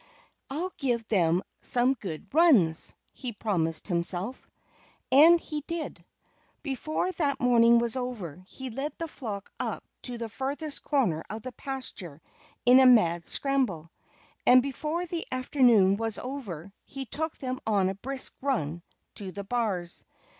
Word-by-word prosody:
"I'll 340 +7 -3
give 240 -6 -1
them 175 -3 +2 0.2
some 250 +2 +5
good 190 - -7
runs!" 245 - +5 0.2
he 250 -3 -6
promised 170 -7 -1
himself. 180 +5 -1 0.6
And 320 +6 +8
he 300 -2 -5
did. 335 -2 -5 0.6
Before 310 +5 -2
that 290 -6 -1
morning 235 -1 +5
was 235 0 0
over 210 - -5
he 260 +3 -7
led 275 +6 -4
the 330 - -4
flock 210 -10 -7
up - - -3 0.2
to 245 -2 -5
the 230 -1 -4
furthest 280 +6 -4
corner 225 - +1
of 215 +1 -6
the 255 - -6
pasture 235 - -6 0.5
in 250 +2 +8
a 265 - +6
mad 175 -9 +4
scramble. 235 - 0 0.5
And 250 0 +6
before 300 +6 -3
the 340 -1 -3
afternoon 245 -7 +4
was 225 -1 -2
over 200 - -6
he 270 0 -7
took 315 +6 -4
them 255 -1 -4
on 200 -4 +3
a 190 - -1
brisk 265 +7 -3
run 170 - -1 0.3
to 195 -2 -5
the 200 +2 -6
bars. 195 -6 -2
245 Hz, 145 wpm, -28 LUFS, 195-275 Hz, 0.6 s, And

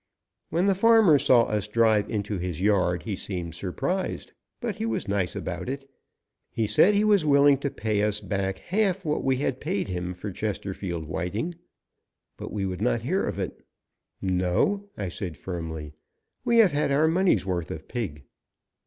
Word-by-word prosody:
When 175 +3 +1
the 200 - +4
farmer 210 -6 +6
saw 120 -2 +5
us 105 -2 -1
drive 110 -1 +3
into 105 -2 -2
his 90 -2 -3
yard 95 -3 +2
he 105 -3 -3
seemed 90 -3 -5
surprised, 140 - -3 0.3
but 230 -5 -3
he 220 - -2
was 230 - -2
nice 100 -3 -1
about - - -4
it. 135 0 -5 0.6
He 115 - -1
said 140 - +4
he 205 - +3
was 205 -5 +4
willing 140 -2 +5
to 140 - -1
pay 110 -4 -1
us 105 0 +1
back 95 -2 -2
half 195 -1 0
what 150 -1 0
we 130 -1 +2
had 130 -1 -2
paid 175 - -2
him 90 0 -3
for 95 +3 -6
Chesterfield 95 -4 -4
Whiting, 90 - -3 0.8
but - - -7
we 100 -1 -2
would 95 0 -4
not 120 0 +1
hear 185 +10 0
of 100 - -3
it. 95 - -5 0.6
"No," 95 - +1
I 100 - -3
said 90 -3 -5
firmly, 80 -3 -6 0.5
"we 235 -1 +2
have 215 -6 +6
had 145 0 0
our 150 +3 +4
money's 180 - +2
worth 90 -3 -2
of - - -7
pig!" 85 - -4
105 Hz, 175 wpm, -26 LUFS, -, 0.8 s, farmer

